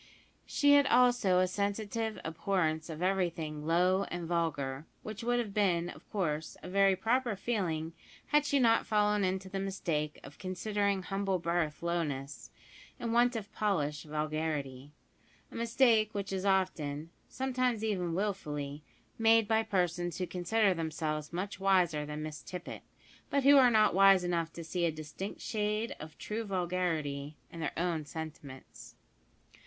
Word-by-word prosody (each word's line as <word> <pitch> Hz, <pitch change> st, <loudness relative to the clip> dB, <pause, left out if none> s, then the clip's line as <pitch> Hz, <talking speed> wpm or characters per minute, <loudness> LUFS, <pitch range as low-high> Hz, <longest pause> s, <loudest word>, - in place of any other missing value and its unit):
She 285 Hz, -1 st, +4 dB
had 285 Hz, -1 st, +6 dB
also 245 Hz, -7 st, +4 dB
a 185 Hz, 0 st, +4 dB
sensitive 210 Hz, +3 st, -2 dB
abhorrence 160 Hz, -1 st, -1 dB
of 160 Hz, +2 st, -5 dB
everything 165 Hz, -5 st, -1 dB
"low 180 Hz, +3 st, +3 dB
and 175 Hz, -1 st, -5 dB
vulgar," 150 Hz, -4 st, -2 dB, 0.2 s
which 215 Hz, +1 st, -6 dB
would 245 Hz, +1 st, +1 dB
have 225 Hz, -4 st, -2 dB
been, 175 Hz, -5 st, +1 dB
of -, -, -12 dB
course, 160 Hz, -6 st, -2 dB
a -, -, -7 dB
very 195 Hz, 0 st, +4 dB
proper 235 Hz, +2 st, +1 dB
feeling 175 Hz, -7 st, -2 dB, 0.4 s
had 295 Hz, 0 st, +4 dB
she 285 Hz, -1 st, +1 dB
not 230 Hz, -3 st, +3 dB
fallen 210 Hz, -1 st, +2 dB
into 190 Hz, +1 st, -1 dB
the 195 Hz, +1 st, -4 dB
mistake 165 Hz, -6 st, -2 dB
of 140 Hz, -, -12 dB
considering 200 Hz, +1 st, -1 dB
humble 195 Hz, 0 st, -1 dB
birth 170 Hz, -2 st, -1 dB
lowness, 145 Hz, -7 st, -3 dB, 0.5 s
and 230 Hz, -1 st, -2 dB
want 240 Hz, +1 st, +4 dB
of 210 Hz, -2 st, -5 dB
polish 150 Hz, -9 st, 0 dB
vulgarity 150 Hz, -3 st, -3 dB, 0.6 s
a -, -, -12 dB
mistake 230 Hz, -2 st, +3 dB
which 200 Hz, -1 st, -3 dB
is 190 Hz, 0 st, -2 dB
often 165 Hz, -5 st, 0 dB, 0.2 s
(sometimes 255 Hz, -4 st, -1 dB
even 180 Hz, -6 st, -1 dB
wilfully) 150 Hz, -8 st, -3 dB, 0.4 s
made 225 Hz, -1 st, +5 dB
by 220 Hz, 0 st, +3 dB
persons 175 Hz, -5 st, -1 dB
who 185 Hz, -, -1 dB
consider 185 Hz, +4 st, +1 dB
themselves 155 Hz, -2 st, -3 dB
much 190 Hz, +3 st, -4 dB
wiser 180 Hz, -6 st, +2 dB
than 150 Hz, 0 st, -5 dB
Miss 155 Hz, -1 st, -6 dB
Tippet, 180 Hz, -1 st, -7 dB, 0.5 s
but 280 Hz, -1 st, +1 dB
who 285 Hz, +2 st, +7 dB
are 255 Hz, -2 st, +7 dB
not 220 Hz, -2 st, +4 dB
wise 195 Hz, 0 st, +6 dB
enough 170 Hz, -2 st, -1 dB
to 170 Hz, -, -7 dB
see 175 Hz, +2 st, -2 dB
a 165 Hz, -, +2 dB
distinct 155 Hz, +6 st, -7 dB
shade 215 Hz, +1 st, -1 dB
of 155 Hz, 0 st, -10 dB
true 220 Hz, +2 st, -4 dB
vulgarity 170 Hz, -7 st, -2 dB
in 170 Hz, -, -9 dB
their 160 Hz, -, -2 dB
own 170 Hz, -2 st, 0 dB
sentiments. 150 Hz, -4 st, -9 dB
185 Hz, 150 wpm, -32 LUFS, 160-210 Hz, 0.6 s, who